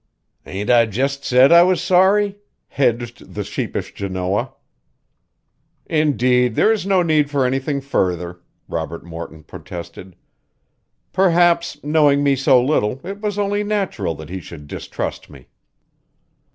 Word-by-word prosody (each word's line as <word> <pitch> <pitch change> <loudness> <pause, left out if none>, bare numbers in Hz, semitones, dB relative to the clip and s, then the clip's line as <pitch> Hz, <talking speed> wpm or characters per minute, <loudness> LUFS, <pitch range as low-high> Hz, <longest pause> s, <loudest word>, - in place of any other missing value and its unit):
"Ain't 100 +5 -2
I 120 -2 +5
just 135 +6 -2
said 130 +2 +5
I 170 0 +8
was 180 0 +3
sorry?" 195 +2 +3 0.3
hedged 120 -3 -2
the - - -2
sheepish - - -4
Janoah. 95 0 -2 1.3
"Indeed, 125 -6 +2
there 220 - +4
is 210 -4 -1
no 190 -2 +3
need 155 -3 +2
for 140 -3 +1
anything 135 +2 -1
further," 90 -9 -2 0.3
Robert 85 0 -5
Morton 85 -2 -9
protested. 90 +3 -10 1.0
"Perhaps, 175 -4 +2
knowing 145 -1 +3
me 140 -1 +3
so 130 -1 +4
little, 125 -2 0
it 200 +2 -7
was 210 -2 -2
only 205 0 0
natural 195 - -2
that 80 +1 -10
he 95 +1 -5
should 80 -4 -11
distrust - - -6
me." - - -16
135 Hz, 130 wpm, -20 LUFS, -, 1.3 s, I